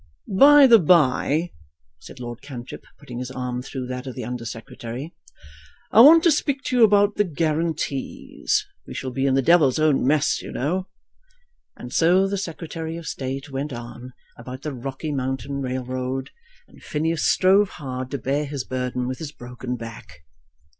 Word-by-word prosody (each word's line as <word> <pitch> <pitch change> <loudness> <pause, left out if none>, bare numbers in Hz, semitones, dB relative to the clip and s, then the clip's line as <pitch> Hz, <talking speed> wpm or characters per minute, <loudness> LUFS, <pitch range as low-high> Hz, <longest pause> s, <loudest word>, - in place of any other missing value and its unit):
"By 285 +6 +8
the 235 -3 +8
bye," 160 0 +3 0.5
said - - -13
Lord 120 -1 -7
Cantrip, 130 -4 -9
putting 120 -1 -9
his 125 0 -5
arm 125 -1 -4
through 130 0 -6
that 125 +1 -5
of 130 - -6
the 125 -4 -5
Under 120 0 -5
Secretary, 115 - -7 0.8
"I 220 - +8
wanted 320 +6 +9
to 335 - +5
speak 280 -2 0
to 255 - -1
you 240 - +6
about 205 -1 +4
the 210 - +4
guarantees. 160 -4 -2 0.2
We - - -8
shall 130 -1 -4
be 135 +2 0
in 135 - +2
the 135 - +2
devil's 155 -4 +4
own 155 -3 +2
mess, 145 +2 +2
you - - -8
know 180 +8 -2 0.5
" 485 -1 -43
And 125 - -9
so 180 +4 +4
the 200 0 -2
Secretary 165 -2 -5
of 170 - -9
State 135 +1 -5
went 135 +1 -4
on 120 +1 -9 0.3
about 130 +3 -9
the 150 - -4
Rocky 135 +4 -5
Mountain 135 0 -3
Railroad, 130 0 -3 0.4
and - - -19
Phineas 160 +2 -2
strove 195 +2 +4
hard 130 -4 -6
to 140 - -3
bear 140 +3 -1
his 140 -2 -4
burden 125 -1 -3
with 130 0 -4
his 155 -3 -6
broken 125 -1 -6
back. 115 -9 -10
140 Hz, 175 wpm, -23 LUFS, 125-170 Hz, 0.8 s, wanted